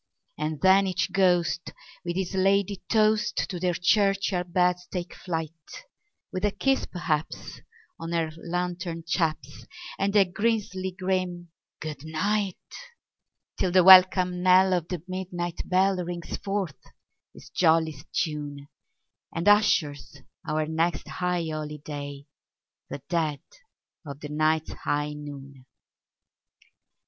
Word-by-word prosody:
And 155 0 -3
then 190 +1 +5
each 185 0 -1
ghost 175 -4 +1 0.3
with 175 -1 -3
his 190 -1 -2
ladye 195 0 +2
toast 215 -1 +2
to 180 - -5
their 180 -1 0
churchyard 195 -1 +1
beds 180 0 +1
take 180 -1 -4
flight, 165 -3 -4 0.8
With 185 - -3
a 205 - +4
kiss, 270 +7 0
perhaps, 160 -4 -3 0.4
on 165 0 -5
her 165 -2 0
lantern 175 0 -3
chaps, 155 -4 -2 0.3
and 200 +1 0
a 200 -2 +6
grisly 195 -1 -1
grim 185 -2 -2 0.3
"good 150 -3 -6
night"; 195 +5 -1 1.0
Till 185 - +2
the 185 0 +5
welcome 185 -1 +7
knell 185 +1 +5
of 175 -2 0
the 175 -4 -5
midnight 175 -2 -4
bell 190 +1 +3
rings 175 0 -5
forth 195 -9 -3 0.5
its - - -14
jolliest 160 -4 +2
tune, 145 -3 -3 0.6
And 170 +4 -3
ushers 170 -10 +3 0.3
our 155 0 0
next 160 0 -1
high 175 +2 -1
holiday—the 145 -2 -8
dead 160 -4 -1 0.6
of 140 -3 -8
the 150 - -7
night's 155 +1 +1
high 150 0 -2
noon! 140 -3 -10
175 Hz, 115 wpm, -26 LUFS, 155-190 Hz, 1.0 s, welcome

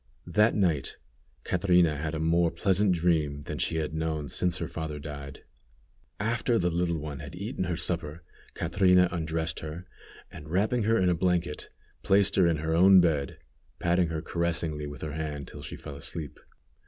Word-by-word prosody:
That 105 +6 +3
night 85 -9 0 0.5
Catrina 90 -3 +3
had 80 +2 -3
a - - -3
more 85 +1 +3
pleasant 95 +3 +2
dream 80 -5 +1
than 75 +2 -6
she 85 -1 0
had 80 -1 -2
known 80 -2 -2
since 90 +4 0
her 85 - -3
father 80 -2 -5
died. 70 -2 -8 0.8
After 115 +3 +1
the 90 -4 +1
little 85 0 0
one 75 -2 -6
had - - -8
eaten 95 - -3
her 85 -2 -2
supper, 85 -1 -2 0.3
Catrina 90 +1 +3
undressed 80 -1 -2
her, 80 +3 -7 0.5
and 75 0 -10
wrapping 105 +6 +1
her 115 +1 +3
in 90 -3 +3
a - - +3
blanket, 90 -2 -1 0.3
placed 100 0 +3
her 90 -3 +5
in 85 -2 +2
her 80 +1 -2
own 95 +3 +7
bed, 75 -6 +1 0.4
patting 85 0 +2
her 80 0 -4
caressingly 80 -3 -2
with 70 -3 -8
her 75 -2 -4
hand 75 -2 -4
till - - -10
she - - -7
fell 70 - -9
asleep. 75 0 -6
85 Hz, 175 wpm, -28 LUFS, 75-90 Hz, 0.8 s, own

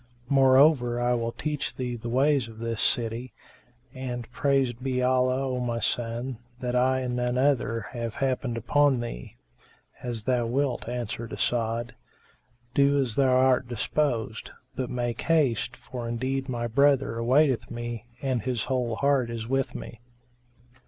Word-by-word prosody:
Moreover 135 -2 +5
I 120 0 +2
will 115 -1 -1
teach 150 +3 -3
thee 125 -1 -3
the 115 0 -6
ways 135 0 +2
of 110 -1 -12
this 115 -1 -3
city; 120 +2 0 0.6
and, 125 -3 -5
praised 130 -1 +1
be 130 -1 0
Allah, 130 +1 +2
O 130 -1 -2
my 120 -1 -1
son, 120 +1 -2 0.2
that 125 -1 -2
I, 130 +1 +3
and 125 -1 -2
none 125 0 0
other 125 -4 +1
have 115 -2 -4
happened 130 -3 -1
upon 145 +3 +3
thee." - - -6 0.7
"As 120 -3 -3
thou 120 -1 +1
wilt," 130 -1 -1
answered 115 -2 -4
As'ad, 115 0 -1 0.8
"do 140 0 +4
as 125 -6 0
thou 135 -2 +3
art 130 -1 +3
disposed, 120 -2 -1 0.3
but 130 -2 -3
make 120 -2 -2
haste, 130 -6 +1
for 120 -2 -7
indeed 130 +3 -2
my 120 -2 -2
brother 135 0 +2
awaiteth 130 +2 +3
me 120 -1 -5 0.2
and 130 -4 0
his 120 -1 -1
whole 125 -4 -1
heart 140 -2 +2
is 115 -1 -5
with 135 +1 -1
me." 115 - -8
125 Hz, 150 wpm, -27 LUFS, 115-130 Hz, 0.8 s, Moreover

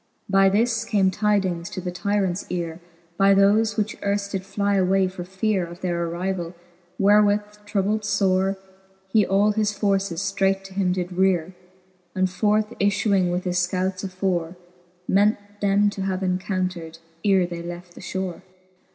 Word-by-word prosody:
By 195 0 +4
this 225 +3 +1
came 195 -4 +2
tydings 190 -4 0
to 210 - -6
the 180 -1 -4
tyrants 195 0 -1
eare 170 -2 -3 0.4
By 195 0 +5
thofe, 210 +2 +3
which 215 0 -1
earft 200 0 -1
did 195 -2 -3
fly 200 +1 -1
away 190 0 +3
for 185 -1 -6
feare 190 +1 -1
Of 175 +1 -11
their 170 -2 -1
arrivall: 175 0 -3 0.4
wherewith 205 +1 +4 0.2
troubled 210 +1 0
fore, 195 -1 +1 0.5
He 210 0 +3
all 200 +2 +3
his 210 0 0
forces 195 -4 0
ftreight 195 -1 0
to 195 0 -11
him 190 -2 +1
did 180 -1 -2
reare, 185 -1 +1 0.6
And 185 0 +2
forth 210 +4 +1
ifluing 200 -2 +2
with 180 +1 -1
his 180 -1 -1
fcouts 185 +1 -1
afore, 185 -3 -2 0.5
Meant 205 +3 +3 0.2
them 205 0 +3
to 200 - -6
have 190 0 -2
incountred, 185 -3 -2 0.3
ere 195 -3 +4
they 170 -1 -6
left 175 +1 -8
the - - -12
fhore. 190 -2 -4
195 Hz, 155 wpm, -23 LUFS, 180-205 Hz, 0.6 s, By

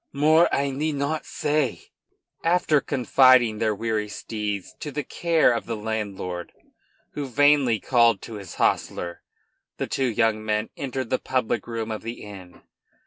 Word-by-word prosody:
More, 155 +4 +4
I 140 0 0
need 150 +3 -2
not 145 +3 -2
say." 145 -5 -1 0.5
After 165 -4 +3
confiding 130 -4 +4
their 110 -2 +1
weary 110 -1 -2
steeds 105 -1 -4
to 150 - -5
the 145 +1 -3
care 165 -3 +2
of 115 - -4
the 115 - -2
landlord, 100 -5 -4 0.6
who 145 -2 -4
vainly 140 -3 +3
called 115 -2 +3
to 115 - -8
his 100 - -10
hostler, 85 -1 -1 0.6
the - - -2
two 135 - -1
young 110 -2 +1
men 105 0 -1
entered 130 -3 -4
the 130 - +2
public 120 -4 -1
room 115 -1 -4
of 110 - -4
the 115 +1 -7
inn. 95 -4 -12
120 Hz, 150 wpm, -24 LUFS, 110-140 Hz, 0.6 s, More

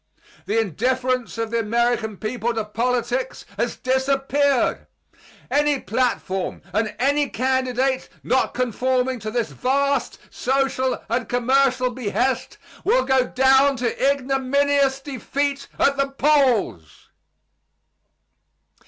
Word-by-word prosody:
The 220 +2 +1
indifference 250 - -1
of 225 -1 -3
the 235 - +1
American 230 -1 0
people 235 +2 -2
to 220 -2 -2
politics 245 +3 -2
has 235 +4 -1
disappeared. 270 +1 +1 0.6
Any 295 -1 +2
platform 205 -5 -2
and 210 0 -1
any 285 +2 +1
candidate 260 +1 0
not 260 - +1
conforming 255 +1 0
to 215 0 -5
this 235 +1 -2
vast 275 +1 0
social 265 0 0
and 235 0 -2
commercial 255 +1 +2
behest 250 +2 -2 0.3
will - - +2
go 265 -1 +2
down 265 +1 +4
to 250 +3 +1
ignominious 275 0 +1
defeat 280 +1 -3
at 280 0 +2
the 275 0 +1
polls. 260 - +1
255 Hz, 105 wpm, -22 LUFS, 235-275 Hz, 0.6 s, down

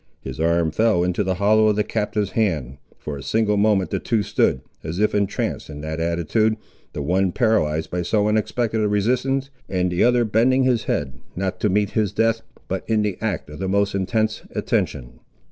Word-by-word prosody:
His 65 0 -7
arm 85 0 +2
fell 110 0 +2
into 90 +3 0
the 95 -1 -1
hollow 110 +3 +4
of 105 - +3
the 105 - +1
captive's 105 -2 -2
hand. 75 - -1 0.2
For 75 -1 -6
a - - -8
single 110 +3 +1
moment 100 -2 +2
the - - 0
two 110 -3 0
stood, 65 -7 +1 0.2
as 80 +2 -4
if 105 +2 +2
entranced 100 -6 -1
in 75 -1 -7
that 80 +1 -4
attitude, 85 +7 +1 0.4
the 75 - -4
one 90 +4 +1
paralysed 80 - +1
by 90 - -1
so 105 +4 +1
unexpected 110 +1 0
a 105 - +2
resistance, 130 +6 0 0.2
and 90 -1 0
the 90 - +2
other 120 -1 +4
bending 120 +5 +3
his 125 -3 +1
head, 70 -2 -2 0.2
not 95 0 -2
to 105 - +1
meet 100 +1 +1
his 105 -3 0
death, 115 +1 +1 0.3
but 95 0 -3
in 110 -1 +2
the 100 -4 -2
act 110 -6 -2
of 75 - -9
the 95 0 -2
most 100 +1 +1
intense 110 +3 0
attention. - - -2
100 Hz, 195 wpm, -22 LUFS, 85-110 Hz, 0.4 s, hollow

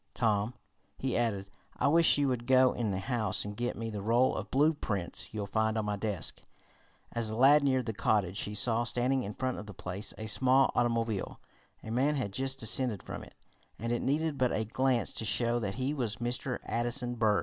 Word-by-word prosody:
"Tom," 110 0 +1 0.4
he 130 -1 -2
added, 100 -5 -1 0.3
"I - - +2
wish 165 +2 +5
you 145 -1 +2
would 120 -2 -2
go 130 -1 +5
in 115 -3 -2
the 95 - -1
house 110 -1 -1
and 105 0 -6
get 120 +3 -2
me 115 0 -4
the 105 -2 -5
roll 120 +5 +3
of - - -5
blueprints 135 - 0
you'll 105 -2 -3
find 110 +2 0
on 110 - -1
my 105 0 -1
desk." 100 -4 -2 0.7
As 115 -2 -2
the 110 - -4
lad 140 +5 +6
neared 130 -3 +2
the 110 - -3
cottage 100 -2 0
he 105 - -4
saw, 115 +2 +2
standing 125 +3 0
in 105 -3 -6
front 130 -1 -2
of 105 - -9
the 105 - -9
place, 95 +4 -4
a 110 - -6
small 130 +4 +3
automobile. 115 -4 -1 0.4
A 110 - -6
man 135 +6 +2
had 120 -8 -3
just 135 +2 -2
descended 115 -2 +1
from - - -6
it, - - -15 0.4
and 115 +1 -3
it 120 - 0
needed 150 +1 0
but 125 -1 +2
a 110 - -1
glance 130 +2 +1
to - - -3
show 120 +2 +1
that 100 -4 -3
he 130 +3 -1
was 120 -7 -2
Mr. 125 +2 -2
Addison 120 +1 +1
Berg. 110 -3 +2
120 Hz, 210 wpm, -31 LUFS, 105-130 Hz, 0.7 s, lad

